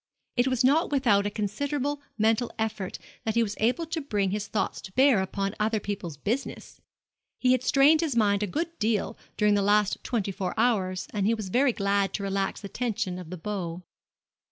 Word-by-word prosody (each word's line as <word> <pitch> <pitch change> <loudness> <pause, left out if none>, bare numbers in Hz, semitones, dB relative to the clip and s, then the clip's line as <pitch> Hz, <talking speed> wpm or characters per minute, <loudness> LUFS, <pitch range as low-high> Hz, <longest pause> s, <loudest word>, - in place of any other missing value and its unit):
It 245 +1 +3
was 255 -1 +1
not 290 +6 +4
without 215 -8 +3
a - - 0
considerable 280 +8 -2 0.2
mental 225 +2 +2
effort 215 -4 -3 0.3
that 220 0 -1
he 235 - +4
was 210 -2 -3
able 250 +10 +1
to 325 0 -3
bring 205 -8 0
his 210 0 -2
thoughts 200 -2 -2
to 190 - -10
bear 260 -5 +5
upon 195 +1 -2
other 215 +1 +1
people's 195 -7 -5
business. 230 - -4 0.6
He 250 - +3
had 255 -1 +3
strained 285 +4 +5
his 310 -7 -1
mind 205 -3 +3
a 210 - 0
good 330 - -3
deal 215 -1 0 0.2
during 210 0 +4
the 205 - +3
last 205 0 +2
twenty 215 -6 -1
four 190 -2 -3
hours, 190 -6 +1
and 205 -2 0
he 230 - +3
was 215 -4 -5
very 255 +6 +3
glad 200 -2 0
to 200 - -3
relax 195 0 -1
the 200 - -6
tension 200 -5 -2
of 175 -3 -9
the 185 - -6
bow. 180 -1 -4
210 Hz, 200 wpm, -27 LUFS, 195-250 Hz, 0.6 s, bear